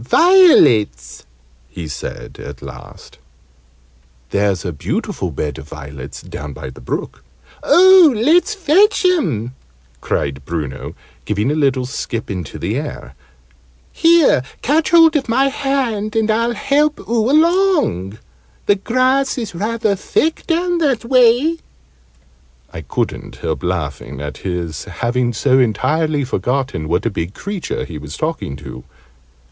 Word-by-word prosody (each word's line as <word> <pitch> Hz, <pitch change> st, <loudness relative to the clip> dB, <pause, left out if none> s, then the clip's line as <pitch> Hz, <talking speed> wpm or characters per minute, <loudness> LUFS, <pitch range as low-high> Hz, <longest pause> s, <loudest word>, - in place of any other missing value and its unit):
"Violets," 115 Hz, -, +4 dB, 0.4 s
he 85 Hz, -3 st, -7 dB
said, 75 Hz, -, -7 dB
at 70 Hz, -2 st, -9 dB
last. -, -, -12 dB, 1.1 s
"There's 100 Hz, -2 st, 0 dB
a 90 Hz, -, -3 dB
beautiful 70 Hz, -, -3 dB
bed 75 Hz, -4 st, -4 dB
of 70 Hz, +3 st, -12 dB
violets 70 Hz, -3 st, -9 dB
down 75 Hz, -1 st, -7 dB
by 65 Hz, -, -8 dB
the 65 Hz, -, -14 dB
brook 65 Hz, +2 st, -5 dB, 0.2 s
" -, -, -26 dB
"Oh, 370 Hz, -3 st, +7 dB
let's 335 Hz, -, +3 dB
fetch 390 Hz, +3 st, +3 dB
'em!" 150 Hz, -, +1 dB, 0.5 s
cried 70 Hz, 0 st, -2 dB
Bruno, 75 Hz, -4 st, -5 dB, 0.3 s
giving 105 Hz, +5 st, 0 dB
a -, -, +1 dB
little 135 Hz, -4 st, +1 dB
skip 115 Hz, -3 st, -5 dB
into 90 Hz, -7 st, -6 dB
the -, -, -2 dB
air. 60 Hz, -, -6 dB, 0.8 s
"Here! 330 Hz, -, +4 dB, 0.2 s
Catch 305 Hz, +5 st, +2 dB
hold 330 Hz, -1 st, +6 dB
of 275 Hz, -5 st, 0 dB
my 265 Hz, +4 st, +3 dB
hand, 250 Hz, -7 st, -2 dB
and 220 Hz, -1 st, +2 dB
I'll 230 Hz, +2 st, 0 dB
help 295 Hz, +6 st, +1 dB
oo 230 Hz, +1 st, +1 dB
along. 310 Hz, -, +2 dB, 0.5 s
The 205 Hz, -, +3 dB
grass 255 Hz, +6 st, +1 dB
is 230 Hz, -6 st, -4 dB
rather 215 Hz, +3 st, -1 dB
thick 315 Hz, -, -1 dB
down 350 Hz, +1 st, 0 dB
that 270 Hz, -8 st, 0 dB
way." 255 Hz, +6 st, +3 dB, 1.1 s
I 80 Hz, -, -6 dB
couldn't 70 Hz, -, -4 dB
help 80 Hz, -4 st, -4 dB
laughing 75 Hz, -6 st, -4 dB
at 75 Hz, 0 st, -6 dB
his 85 Hz, -5 st, -4 dB
having 120 Hz, 0 st, -1 dB
so 130 Hz, +4 st, +2 dB
entirely 150 Hz, +6 st, +1 dB
forgotten 130 Hz, -, -2 dB
what 90 Hz, +6 st, 0 dB
a 115 Hz, -, 0 dB
big 90 Hz, 0 st, -4 dB
creature 200 Hz, -3 st, -4 dB
he 80 Hz, -3 st, -8 dB
was 75 Hz, +1 st, -8 dB
talking 155 Hz, -, -3 dB
to. 65 Hz, -3 st, -10 dB
155 Hz, 135 wpm, -18 LUFS, -, 1.1 s, Oh